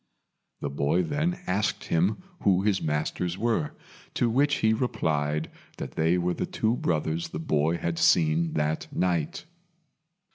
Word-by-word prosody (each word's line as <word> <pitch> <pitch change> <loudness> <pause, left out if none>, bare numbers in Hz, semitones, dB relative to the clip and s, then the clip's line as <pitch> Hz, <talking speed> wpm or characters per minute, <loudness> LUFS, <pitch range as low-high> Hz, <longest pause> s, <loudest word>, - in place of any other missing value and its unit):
The 70 - -2
boy 70 +6 +1
then 155 - -1
asked 100 +3 0
him 95 - +1 0.2
who 95 -1 +3
his 100 -2 +2
masters 80 +3 -1
were, 110 -9 0 0.4
to 120 -2 +2
which 145 +4 +3
he 110 0 +2
replied 75 - -1 0.3
that - - -5
they 80 +3 +2
were 90 0 0
the - - -3
two 110 +2 0
brothers 80 -4 -1
the - - -6
boy 80 +1 +1
had 85 0 -2
seen 80 0 +3
that 75 +1 -1
night. 85 - -1
85 Hz, 145 wpm, -27 LUFS, 80-105 Hz, 0.4 s, who